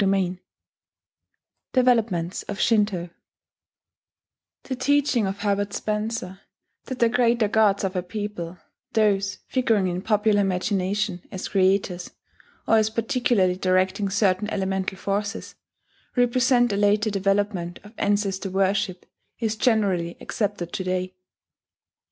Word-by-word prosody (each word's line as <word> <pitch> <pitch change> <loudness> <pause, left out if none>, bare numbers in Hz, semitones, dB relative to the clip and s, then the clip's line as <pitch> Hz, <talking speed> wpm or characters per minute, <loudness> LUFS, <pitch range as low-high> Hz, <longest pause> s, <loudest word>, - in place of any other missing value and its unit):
DEVELOPMENTS 225 -9 +2
OF 205 - -5
SHINTO 205 -6 +1 1.5
The 260 - -4
teaching 280 -5 +2
of 195 +1 -4
Herbert 205 -1 0
Spencer 210 -3 -3 0.5
that 260 - -5
the 235 - +4
greater 235 -2 +2
gods 205 -1 +3
of 190 0 -2
a 180 - +1
people 185 -2 -5 0.4
those 200 -2 +2
figuring 225 -7 +1
in 180 0 -2
popular 210 0 +2
imagination 195 0 -1
as 185 - -5
creators, 190 -2 +1 0.6
or 225 - +5
as 215 0 +3
particularly 230 -5 +1
directing 185 +2 +1
certain 195 +1 +1
elemental 190 -1 -2
forces 200 +3 -3 0.6
represent 245 -1 +3
a - - 0
later 210 +1 +2
development 195 -3 0
of 210 +2 -14
ancestor 200 -1 0
worship, 190 -1 0 0.3
is 220 -2 -1
generally 200 -7 +1
accepted 200 -5 -3
to 190 - -2
day. 185 0 -2
205 Hz, 110 wpm, -24 LUFS, 185-220 Hz, 1.5 s, or